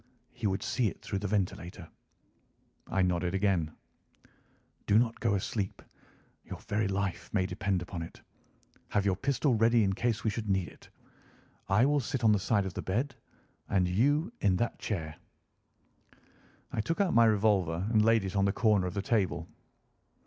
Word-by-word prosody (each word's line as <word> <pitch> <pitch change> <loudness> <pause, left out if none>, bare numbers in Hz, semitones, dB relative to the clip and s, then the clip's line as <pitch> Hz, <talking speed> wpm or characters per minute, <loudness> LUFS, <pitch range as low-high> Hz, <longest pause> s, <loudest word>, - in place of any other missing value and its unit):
He 120 -3 -3
would 95 +2 -1
see 110 +1 +1
it - - -5
through 100 - -3
the 105 - -3
ventilator." 90 -3 -3 1.0
I 95 - +1
nodded 90 0 0
again. 95 -6 +1 1.2
"Do 105 - +5
not 115 0 +1
go 100 - +1
asleep; 100 0 -3 0.6
your - - -8
very 105 0 -1
life 95 -1 -2
may 95 -3 +2
depend 95 -1 -1
upon 90 -1 -6
it. 85 - -8 0.7
Have 100 - 0
your 95 -2 +2
pistol 140 +2 +1
ready 115 +1 +4
in 95 -1 +1
case 115 +2 -1
we 110 - +1
should 105 -1 -4
need 95 -2 +1
it. - - -18 0.8
I 105 +6 +4
will 145 +1 +3
sit 130 -1 -3
on 110 - +6
the 105 - +3
side 100 +1 +1
of 95 - -4
the - - -4
bed, 125 +9 -1 0.6
and 95 -2 +2
you 145 - +2
in 95 -2 +3
that 115 +4 -2
chair." 80 -7 -4 1.6
I - - -1
took 165 - -2
out 200 -3 +2
my 115 0 +6
revolver 100 -5 +2
and 110 -2 +4
laid 115 -1 +4
it 95 +1 -4
on 100 0 +3
the 100 - +2
corner 105 -4 +2
of 90 - -6
the 100 - -2
table. 105 -6 0
100 Hz, 175 wpm, -30 LUFS, 95-115 Hz, 1.6 s, on